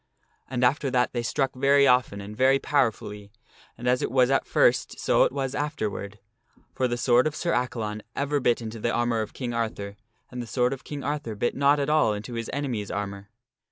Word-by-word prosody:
And 125 -1 -1
after 140 +3 +2
that 125 -1 +1
they 120 - -1
struck 135 +3 -1
very 140 +2 +4
often 125 -6 +2
and 105 +2 -8
very 130 +3 +4
powerfully, 105 -7 -1 0.5
and 120 - -5
as 125 0 +3
it - - -1
was 130 0 +3
at 135 - +1
first - - +2
so - - +4
it - - -1
was 135 -1 -3
afterward, 110 -9 -3 0.6
for 130 - 0
the 120 0 -2
sword 120 +2 +4
of 150 - -4
Sir 170 - -1
Accalon 110 -4 -2
ever 145 +1 0
bit 120 -2 +1
into 110 0 -6
the 120 - 0
armor 120 -1 +1
of 110 - -6
King 125 -3 -4
Arthur, 110 -3 -3 0.4
and 125 -1 -5
the 120 - -7
sword 125 +2 +1
of 135 - -8
King 145 -2 -6
Arthur 145 -6 -3
bit 120 +4 0
not 140 +1 +3
at 140 - 0
all 150 -8 +3
into 110 +4 -7
his 115 -1 -4
enemy's 125 -8 -3
armor. 100 0 -5
125 Hz, 210 wpm, -26 LUFS, 110-135 Hz, 0.6 s, very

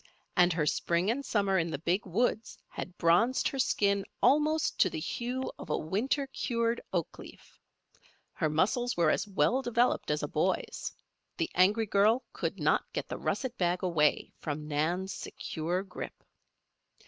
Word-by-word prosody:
And 180 0 +5
her 160 -2 0
spring 170 +6 +1
and 275 +4 -2
summer 200 -6 +1
in 165 0 -1
the 155 - -3
Big 175 +6 -1
Woods 220 +4 0
had 180 - -7
bronzed 180 +10 +3
her 270 - -5
skin 200 -5 +2 0.2
almost 305 +2 +2
to 185 - +5
the 160 - -4
hue 250 +10 -3
of - - -9
a - - +1
winter 225 - -1
cured 235 -3 -1
oak 175 -4 -2
leaf. - - -13 0.7
Her 155 - 0
muscles 215 +10 +1
were 165 -3 +4
as 205 - 0
well 235 +6 +2
developed 240 0 +1
as - - 0
a - - 0
boy's. - - -1 0.5
The 335 -1 -1
angry 205 +5 +4
girl 215 +5 +3
could - - -3
not - - +1
get - - -4
the - - -4
russet 260 -3 -2
bag 175 0 +1
away 160 -5 +1
from 150 0 -4
Nan's 170 +6 -1
secure 175 +4 -3
grip. 195 - -8
195 Hz, 160 wpm, -30 LUFS, 170-240 Hz, 0.7 s, And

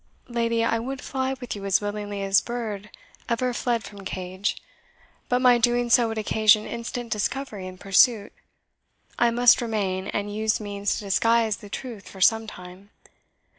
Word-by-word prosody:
"Lady, 230 -1 0
I 230 0 +1
would 265 +4 -5
fly 265 -1 -2
with 245 -3 -5
you 200 - -8
as 195 -1 +3
willingly 205 -1 -4
as 195 0 +4
bird 215 -4 -5 0.4
ever 245 +1 0
fled 235 -1 -1
from 200 -1 -10
cage, 185 +2 -3 0.7
but 250 - +3
my 245 -1 +6
doing 240 0 +1
so 235 0 +5
would 225 0 -4
occasion 215 0 +3
instant 235 0 -5
discovery 210 -2 -3
and 185 0 -10
pursuit. 200 +2 +3 0.9
I 240 - +4
must 240 +1 +5
remain, 200 -5 -2
and 205 0 -3
use 220 0 +1
means 205 -1 -2
to - - -6
disguise 225 +2 +2
the 205 - -12
truth 225 -1 -7
for 190 - -12
some 225 +3 +4
time. 180 0 -11
220 Hz, 165 wpm, -25 LUFS, 200-235 Hz, 0.9 s, my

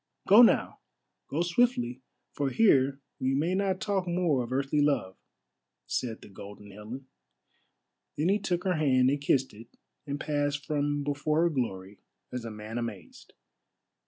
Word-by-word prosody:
Go 205 +5 +9
now! 240 - +4 0.5
Go 160 +4 -1
swiftly, 175 - +1 0.3
for 140 -1 -1
here 135 -8 +3 0.2
we 130 +1 0
may 160 +6 0
not 190 -1 0
talk 195 -3 -1
more 170 -6 +1
of 120 0 -6
earthly 140 +3 +1
love," 135 -11 +1 0.7
said 115 -3 -3
the - - -11
Golden 100 +1 -11
Helen. 110 +7 -9 1.1
Then 155 +5 +1
he 205 +2 +3
took 180 -3 -2
her 185 -4 0
hand 130 -4 +3
and 145 0 -1
kissed 135 -2 +1
it 115 +2 -13 0.4
and 140 0 -3
passed 145 -1 -1
from 145 -1 -1
before 145 +2 0
her 170 - +3
glory 100 -8 -4 0.3
as 125 -2 -4
a - - -4
man 110 +2 -6
amazed. 105 -8 -8
140 Hz, 155 wpm, -28 LUFS, 120-165 Hz, 1.1 s, Go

